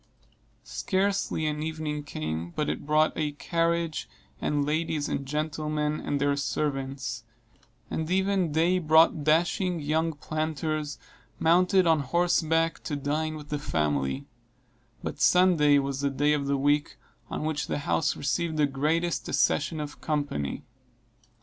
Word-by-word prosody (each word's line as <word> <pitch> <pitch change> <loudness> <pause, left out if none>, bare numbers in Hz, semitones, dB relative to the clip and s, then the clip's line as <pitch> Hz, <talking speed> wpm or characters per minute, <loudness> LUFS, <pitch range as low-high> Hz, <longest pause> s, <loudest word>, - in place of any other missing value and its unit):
Scarcely 195 -5 -1
an 150 0 -1
evening 155 -1 -3
came 80 - -4
but 150 - 0
it - - -4
brought 155 +1 +3
a 150 -2 -1
carriage, 165 +1 -1 0.3
and 145 -1 0
ladies 155 0 -1
and 135 - -3
gentlemen 150 0 -1
and 145 - -1
their 140 0 +2
servants; 135 -4 -2 0.6
and 160 0 -3
every 190 -1 +2
day 165 +4 +2
brought 160 -1 +4
dashing 170 +3 +2
young 160 +2 0
planters, 155 0 -3 0.4
mounted 180 +3 +4
on 160 -2 +4
horseback, 165 +2 +1
to 150 - -2
dine 150 +2 -1
with 150 -1 -9
the 150 - -2
family; 70 - -1 0.8
but - - -5
Sunday 170 -6 +5
was 140 0 -1
the 140 - +1
day 145 +2 +2
of 140 -2 -1
the 140 0 +1
week 145 +2 +1 0.3
on - - -3
which 155 -1 -2
the - - -1
house 145 +1 0
received 160 +3 -1
the 150 - +4
greatest 155 +5 -1
accession 155 +2 +1
of 145 -1 -6
company. 145 - -2
150 Hz, 135 wpm, -27 LUFS, 145-165 Hz, 0.8 s, Sunday